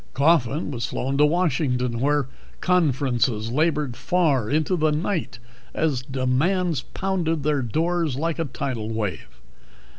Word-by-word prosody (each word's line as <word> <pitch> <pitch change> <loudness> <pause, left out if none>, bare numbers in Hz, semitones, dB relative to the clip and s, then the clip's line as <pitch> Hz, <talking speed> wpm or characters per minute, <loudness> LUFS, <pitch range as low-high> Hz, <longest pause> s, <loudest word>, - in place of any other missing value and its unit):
Coffin 145 0 +2
was 120 -3 -3
flown 135 +2 -2
to 150 - +6
Washington, 140 -8 0
where 145 0 +1 0.3
conferences 130 - +1
labored 150 -2 +1
far 140 -4 +1
into 155 +5 +1
the 155 -2 +2
night 155 - -2 0.4
as 150 -6 0
demands 135 +6 0
pounded 170 -5 -2
their 145 -1 +1
doors 160 +4 0
like 165 +4 -2
a 165 - 0
tidal 125 -5 -4
wave. 105 - -3
145 Hz, 125 wpm, -24 LUFS, 125-165 Hz, 0.4 s, to